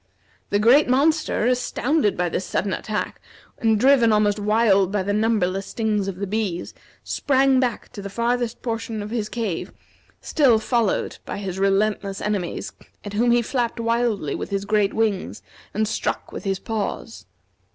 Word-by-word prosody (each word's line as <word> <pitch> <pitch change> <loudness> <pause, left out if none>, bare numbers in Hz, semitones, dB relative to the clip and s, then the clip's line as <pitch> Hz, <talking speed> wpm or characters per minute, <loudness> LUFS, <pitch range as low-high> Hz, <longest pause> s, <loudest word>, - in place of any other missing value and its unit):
The 205 - +2
great 245 +7 +5
monster, 295 -1 +2
astounded 250 0 +1
by 180 - +1
this 180 - -2
sudden 195 +1 -1
attack, 215 -1 -4 0.4
and 220 -2 +2
driven 255 -2 +5
almost 210 -1 +2
wild 205 -3 +3
by 205 -2 0
the 205 +2 -1
numberless 205 -3 +1
stings 215 -3 -1
of 195 - -3
the 200 +2 -3
bees, 200 -4 -3 0.3
sprang 270 -1 +2
back 245 -4 -1
to 200 - -9
the 200 - -6
farthest 235 +2 -1
portion 225 -2 -3
of 210 - -7
his 220 -3 -2
cave, 215 -8 -3 0.5
still 265 -7 +3
followed 225 -1 0
by - - -5
his 190 -2 -5
relentless 195 0 +1
enemies, 200 -5 -3 0.3
at 205 - -6
whom 235 +4 +2
he 240 0 +4
flapped 240 -1 -2
wildly 230 -7 0
with - - -4
his 200 0 -2
great 210 -1 +2
wings 215 -4 -1 0.3
and 215 +1 0
struck - - -3
with - - -7
his 195 -1 0
paws. 225 +2 -5
215 Hz, 160 wpm, -23 LUFS, 200-235 Hz, 0.5 s, great